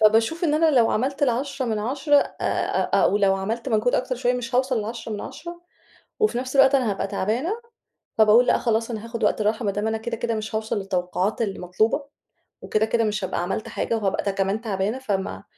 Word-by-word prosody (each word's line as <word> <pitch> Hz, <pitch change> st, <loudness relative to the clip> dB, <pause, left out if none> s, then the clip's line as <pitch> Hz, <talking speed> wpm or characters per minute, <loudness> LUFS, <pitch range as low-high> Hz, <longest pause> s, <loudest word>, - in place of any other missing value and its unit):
فباشوف 225 Hz, +10 st, +3 dB
إن 300 Hz, -2 st, +2 dB
أنا 320 Hz, 0 st, +4 dB
لو 240 Hz, -5 st, +4 dB
عملت 270 Hz, +5 st, -1 dB
ال 280 Hz, -, +5 dB
10 260 Hz, +2 st, -2 dB
من 220 Hz, -2 st, -1 dB
10 275 Hz, +7 st, +1 dB, 0.2 s
آآ -, -, 0 dB, 0.2 s
أو -, -, +3 dB
لو 195 Hz, -1 st, +3 dB
عملت 225 Hz, +6 st, -3 dB
منك 220 Hz, 0 st, 0 dB
أكتر 255 Hz, 0 st, -1 dB
شوية 245 Hz, 0 st, +1 dB
مش 245 Hz, -1 st, -4 dB
هاوصل 255 Hz, -2 st, +2 dB
ل10 225 Hz, +1 st, -6 dB
من 205 Hz, -, -4 dB
10 345 Hz, +2 st, -8 dB, 0.6 s
وفي 430 Hz, -, +2 dB
نفْس 255 Hz, +2 st, -4 dB
الوقت 275 Hz, 0 st, +6 dB
أنا 250 Hz, -6 st, +1 dB
هابقى 195 Hz, -, -2 dB
تعبانة، 220 Hz, -, -1 dB, 0.7 s
فباقول 220 Hz, +3 st, +6 dB
لأ -, -, +4 dB
خلاص 230 Hz, 0 st, 0 dB
أنا 220 Hz, -1 st, -5 dB
هاخد 230 Hz, -1 st, -5 dB
وقت 210 Hz, -, +2 dB
راحة، 220 Hz, +2 st, 0 dB
ما 200 Hz, -, +1 dB
دام 205 Hz, +2 st, -2 dB
أنا 220 Hz, 0 st, 0 dB
كده، 230 Hz, +1 st, -4 dB
كده 230 Hz, 0 st, -1 dB
مش 215 Hz, 0 st, -4 dB
هاوصل 220 Hz, 0 st, -1 dB
للتوقعات 185 Hz, +2 st, -1 dB
المطلوبة، 205 Hz, +6 st, 0 dB, 0.6 s
وكده 215 Hz, 0 st, +1 dB
كده 230 Hz, +1 st, +1 dB
مش 210 Hz, -2 st, -1 dB
هابقى 185 Hz, -, -2 dB
عملت 195 Hz, +4 st, -3 dB
حاجة 230 Hz, -, -2 dB
وهابقى 200 Hz, -1 st, -1 dB
كمان 195 Hz, +3 st, -1 dB
تعبانة؛ 205 Hz, +1 st, -2 dB
فما 195 Hz, -4 st, -2 dB
225 Hz, 205 wpm, -24 LUFS, 210-250 Hz, 0.7 s, الوقت